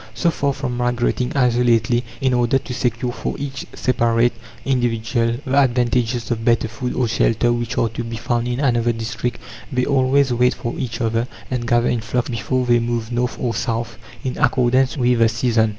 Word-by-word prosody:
So 170 - +2
far 140 -3 0
from 130 -3 -4
migrating 125 +1 0
isolately, 120 -2 +3 0.2
in 130 -1 +2
order 120 +1 +3
to 130 - -6
secure 120 -1 -1
for - - -4
each 140 -2 -5
separate 120 -1 +2 0.3
individual 120 -2 0
the 135 +2 +3
advantages 120 -2 +1
of 115 -1 -1
better 115 -1 +2
food 125 +2 -4
or 125 - +1
shelter 115 +1 +2
which 120 -1 -3
are 115 - +2
to 115 +2 -5
be 115 0 -5
found 120 +1 -1
in 125 +1 -2
another 120 -4 +2
district 115 +1 -3 0.3
they 125 -1 +1
always 135 -1 +3
wait 125 +1 +2
for 120 - -4
each 120 -2 -4
other, 115 +1 0 0.2
and 120 -2 -2
gather 120 0 +3
in 120 - 0
flocks, 120 +2 -2
before 125 +2 -1
they 120 -1 +4
move 115 -1 -2
north 120 +1 -1
or 120 -2 -1
south, 115 0 -3 0.2
in 130 - -3
accordance 130 +3 +2
with 125 -2 +2
the 115 -1 +5
season. 115 -1 +1
120 Hz, 185 wpm, -20 LUFS, 115-125 Hz, 0.3 s, the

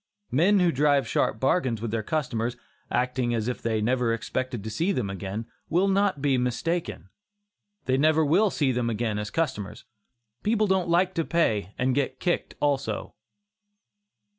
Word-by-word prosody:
Men 185 +10 +4
who 175 -2 +4
drive 145 -3 +2
sharp 110 - 0
bargains 130 -4 +1
with 115 0 -4
their 115 -1 -1
customers, 120 -3 -2 0.3
acting 125 -1 0
as 110 -1 -1
if 125 - -3
they 110 -2 0
never 125 +1 +1
expected 125 -1 -3
to 110 - -5
see 165 - 0
them 120 - -1
again, 100 +3 -5 0.2
will 180 +4 +3
not 195 -6 +1
be 135 -3 +3
mistaken. 125 - -2 0.8
They 130 0 +2
never 155 +2 +3
will 190 +9 +4
see 145 -6 +1
them 120 -1 0
again 110 -1 -1
as 105 -1 -4
customers. 130 -11 -3 0.6
People 215 0 +2
don't 190 -3 +1
like 180 +2 +3
to 165 - 0
pay 110 - 0
and 130 +1 +1
get 140 0 -1
kicked 175 - -1
also. 140 -7 -1
130 Hz, 165 wpm, -26 LUFS, 115-165 Hz, 0.8 s, Men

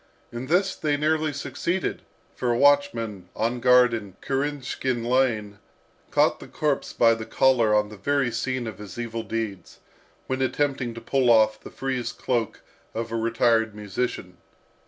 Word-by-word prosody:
In 120 +2 -6
this 185 +5 +2
they 145 -2 0
nearly 155 +1 +1
succeeded, 170 +5 -2 0.3
for 125 - -2
a 120 - +2
watchman, 120 -10 +2
on 115 +3 -1
guard 125 0 +5
in 105 -4 -5
Kirinshkin 135 -3 -2
Lane, 115 -5 +1 0.5
caught - - +2
the - - -10
corpse 150 -3 -1
by 115 -1 +4
the 110 -1 -5
collar 120 -5 +3
on 105 0 +2
the 105 - -10
very 140 +4 0
scene 125 +2 -2
of 110 -4 -7
his 105 -1 -9
evil 115 -1 -3
deeds, 110 -5 -5 0.5
when 130 0 -2
attempting 130 -2 -1
to 115 - -8
pull 130 +1 +1
off 110 -2 +4
the - - -10
frieze 125 -3 -3
cloak 120 -3 -2 0.3
of 115 0 -3
a - - -2
retired 115 -1 +2
musician. 105 -2 -4
120 Hz, 155 wpm, -25 LUFS, 110-135 Hz, 0.5 s, guard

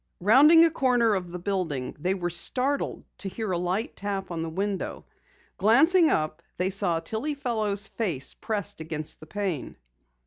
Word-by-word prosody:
Rounding 290 - +7
a 330 - +2
corner 245 -6 +3
of 180 -3 -2
the 180 - -4
building, 175 -9 -2
they 185 +5 0
were 175 -2 -2
startled 255 +11 -1 0.2
to 195 - -5
hear 215 +1 -4
a 175 - +1
light 180 +6 -2
tap 195 -2 -4
on 165 -1 -3
the 165 - -3
window. 195 +4 -3 0.5
Glancing 315 - +5
up, 155 +1 0 0.2
they 185 +2 0
saw 185 -4 0
Tillie 245 - -3
Fellow's 215 -7 -1
face 170 - -3
pressed 210 -7 -3
against 155 -1 -6
the 155 - -12
pane. 190 -6 -3
200 Hz, 165 wpm, -27 LUFS, 175-230 Hz, 0.5 s, Rounding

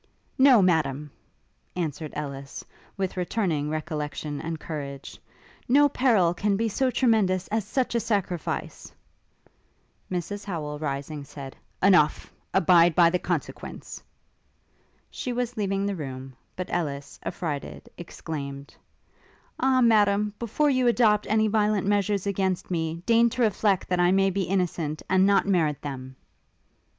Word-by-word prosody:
'No, 260 -6 +6
Madam!' 150 -5 +1 0.6
answered 155 -3 -3
Ellis, 140 -2 -6 0.3
with 190 -1 -3
returning 175 -5 -1
recollection 150 -2 -4
and 160 -1 -4
courage; 140 -4 -7 0.5
'no 290 +3 +6
peril 225 -11 +3
can 200 +2 0
be 230 +2 0
so 260 +5 +1
tremendous 220 -7 +2
as 215 -1 -1
such 250 +4 -1
a 235 - +2
sacrifice!' 200 -7 -3 1.2
Mrs 195 +3 -4
Howel, 150 -6 -5
rising, 145 0 -4
said, 140 -1 -9 0.3
'Enough! 180 -6 +3 0.2
abide 170 -1 +5
by 170 -2 +5
the 180 - +1
consequence.' - - -5 1.1
She 250 - -4
was 245 0 -2
leaving 195 -2 -1
the 200 -1 -1
room; 135 -4 -7 0.2
but 185 - -5
Ellis, 145 -5 -3
affrighted, 150 -5 -5
exclaimed, 140 -5 -7 0.9
'Ah, 260 -1 +3
Madam, 210 -3 +3
before 280 +6 +1
you 255 -2 +2
adopt 220 -3 +3
any 215 +1 +2
violent 210 -2 +1
measures 205 -1 +1
against 190 -2 -1
me, 165 0 -2
deign 235 0 +4
to 245 +1 -1
reflect 205 -3 +1
that 180 -1 +1
I 175 0 +4
may 195 0 +3
be 195 0 -1
innocent, 170 -4 -2
and 185 +1 +4
not 200 -1 +3
merit 165 -7 +1
them!' 130 -2 -7
185 Hz, 130 wpm, -26 LUFS, 155-210 Hz, 1.2 s, No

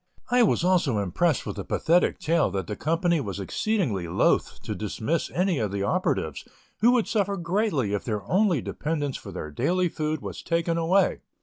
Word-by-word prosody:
I 250 0 +5
was 215 -6 +3
also 175 - +2
impressed 115 - +1
with - - -5
the - - -3
pathetic 175 +2 +2
tale 160 -5 +1
that 95 -1 -3
the 105 - -4
company 165 - +1
was 100 -5 -5
exceedingly 110 - -1
loth 90 +3 +1
to - - -3
dismiss 110 - -2
any 180 -3 0
of 105 -3 -1
the 100 0 -2
operatives, 100 - -1 0.4
who 230 - +5
would 240 -4 +2
suffer 200 -3 0
greatly 170 - 0
if 105 - -1
their 105 -4 -3
only 180 - +2
dependence 150 -3 -2
for - - -8
their 75 - -6
daily 180 - +1
food 155 0 -2
was - - -6
taken 170 0 0
away. 170 +4 +2
165 Hz, 185 wpm, -26 LUFS, -, 0.4 s, I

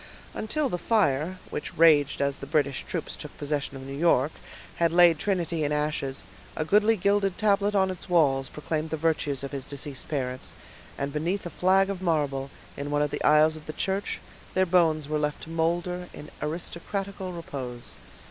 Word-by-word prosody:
Until 285 +7 0
the 180 -8 -3
fire, 185 -5 +1
which - - -5
raged 150 -4 +5
as 140 0 0
the 140 - -8
British 140 -3 +1
troops - - -4
took - - -10
possession 145 -1 -2
of 130 - -9
New 135 - -6
York, 150 -2 +3 0.5
had 170 -1 +3
laid 170 -2 +6
Trinity 175 -5 0
in 145 - 0
ashes, 150 -7 -2 0.3
a 155 - 0
goodly 210 +6 +4
gilded 200 0 +2
tablet 205 -1 +2
on 190 -1 +3
its 185 - -9
walls 135 -6 +3
proclaimed 155 +1 -3
the 160 - -2
virtues 150 -3 0
of 140 - -5
his 135 -2 -5
deceased 140 -1 -5
parents, 130 -4 -3 0.4
and 140 0 -3
beneath 170 +6 -1
a 175 - -5
flag 195 +2 +3
of 190 -2 -5
marble, 145 -6 0 0.3
in 140 +1 -4
one 145 0 +2
of 145 - -1
the - - -3
aisles 155 +1 +5
of 155 -1 -11
the 155 - -4
church, 195 +4 -1 0.4
their 185 0 +4
bones 165 -4 +3
were 155 0 0
left 150 0 -2
to 160 - -9
molder 175 +2 -1
in 150 - -10
aristocratical 185 +4 -3
repose. 135 -8 -7
160 Hz, 185 wpm, -27 LUFS, 145-185 Hz, 0.5 s, laid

